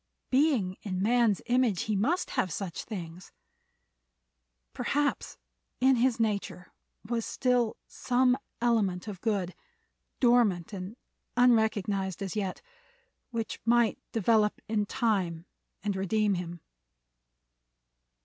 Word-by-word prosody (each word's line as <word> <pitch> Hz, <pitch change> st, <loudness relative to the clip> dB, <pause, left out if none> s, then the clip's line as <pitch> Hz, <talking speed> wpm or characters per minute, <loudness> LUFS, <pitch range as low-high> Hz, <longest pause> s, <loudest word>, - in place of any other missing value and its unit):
Being 255 Hz, -10 st, +2 dB
in 185 Hz, -3 st, -3 dB
man's 225 Hz, 0 st, +2 dB
image 245 Hz, -6 st, +2 dB
he 215 Hz, -, -1 dB
must 295 Hz, -, 0 dB
have 185 Hz, -, 0 dB
such 180 Hz, 0 st, -4 dB
things. 175 Hz, -4 st, -7 dB, 1.4 s
Perhaps 290 Hz, 0 st, -1 dB, 0.4 s
in 260 Hz, 0 st, +4 dB
his 240 Hz, -1 st, +2 dB
nature 200 Hz, -5 st, -2 dB, 0.3 s
was 230 Hz, 0 st, -1 dB
still 245 Hz, -3 st, +1 dB
some 250 Hz, 0 st, +2 dB, 0.2 s
element 220 Hz, -6 st, +1 dB
of 195 Hz, -4 st, -7 dB
good, 200 Hz, -5 st, -1 dB, 0.7 s
dormant 225 Hz, -8 st, +3 dB
and 195 Hz, +4 st, -6 dB, 0.4 s
unrecognized 210 Hz, -6 st, +2 dB
as 195 Hz, +2 st, -4 dB
yet, 195 Hz, -3 st, -3 dB, 0.7 s
which 230 Hz, -3 st, -4 dB
might 235 Hz, 0 st, +3 dB
develop 220 Hz, -1 st, +2 dB
in 210 Hz, -2 st, 0 dB
time 185 Hz, -9 st, 0 dB, 0.4 s
and 205 Hz, -2 st, -1 dB
redeem 205 Hz, +2 st, +1 dB
him. 175 Hz, -2 st, -5 dB
215 Hz, 105 wpm, -29 LUFS, 190-240 Hz, 1.4 s, in